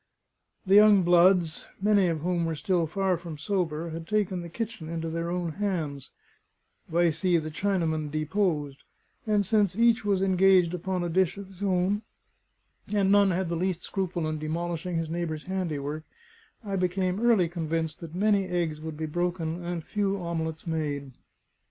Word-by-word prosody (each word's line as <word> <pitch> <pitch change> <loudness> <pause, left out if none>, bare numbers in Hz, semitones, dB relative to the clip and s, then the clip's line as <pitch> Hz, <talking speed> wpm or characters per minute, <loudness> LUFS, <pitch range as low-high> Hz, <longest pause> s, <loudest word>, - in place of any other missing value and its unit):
The 190 - +2
young 205 -2 +7
bloods, 175 -1 +4
many 200 -1 +3
of 165 -3 -1
whom 175 0 0
were 165 - -2
still 170 +1 0
far 190 +1 0
from 165 -2 -8
sober, 165 -1 -2
had 165 0 -7
taken 195 -3 0
the 170 - -7
kitchen 215 -4 -5
into 165 -1 -3
their 165 +1 -2
own 175 -1 -2
hands, 160 -8 -3 0.8
vice 165 -1 +1
the 180 -3 +3
Chinaman 160 -1 -1
deposed; 155 -2 -1 0.5
and 210 -2 +2
since 205 -2 +2
each 230 +1 +3
was 200 -2 +1
engaged 185 -2 +4
upon 180 0 -2
a - - -1
dish 185 +2 +1
of 200 -1 -8
his 190 0 -15
own, 195 +1 +1 0.9
and 200 -2 +2
none 200 -1 +5
had 185 0 0
the 170 - -2
least 180 0 -1
scruple 180 -4 -2
in 155 0 -3
demolishing 170 +2 -3
his 165 0 -1
neighbour's 160 -2 -3
handiwork, 155 -6 -3 0.6
I 195 -1 -2
became 185 +1 0
early 225 -7 +4
convinced 160 -2 -3
that 165 -1 -9
many 200 0 +2
eggs 170 -4 -2
would 160 -1 -6
be 160 - -2
broken 175 +1 -2
and 170 -1 -4
few 200 +1 -1
omelets 160 -2 -4
made. 145 -4 -3
175 Hz, 165 wpm, -27 LUFS, 160-190 Hz, 0.9 s, young